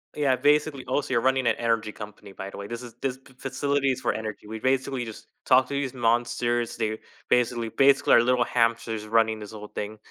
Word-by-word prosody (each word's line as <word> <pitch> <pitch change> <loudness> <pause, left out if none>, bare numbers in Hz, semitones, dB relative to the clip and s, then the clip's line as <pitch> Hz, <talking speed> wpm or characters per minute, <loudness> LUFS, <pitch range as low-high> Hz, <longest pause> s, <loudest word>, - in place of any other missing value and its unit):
yeah, 140 -3 +2
basically, 145 +1 +2
also 140 +2 -1
you're 120 -2 +2
running 130 0 +2
an 115 - +3
energy 115 -2 0
company, 105 -2 -10
by 95 +1 -7
the - - -10
way. 100 0 -6
This 120 +2 -6
is 120 -2 -10
this 130 -2 -2
f 130 - -20
facilities 140 -1 0
for - - +1
energy, 110 -1 -6
we 110 +1 -6
basically 130 0 0
just 110 -2 -9 0.2
talk 130 0 +5
to - - -4
these 140 -2 -2
monsters, 120 0 0
they 110 -1 -2 0.3
basically 120 -2 +1
basically 135 +4 +4
our - - +8
little 125 0 +3
hamsters 115 -2 0
running 110 0 +2
this 105 -1 -9
whole 105 -1 -9
thing. 105 +1 -5
120 Hz, 210 wpm, -26 LUFS, 110-130 Hz, 0.3 s, our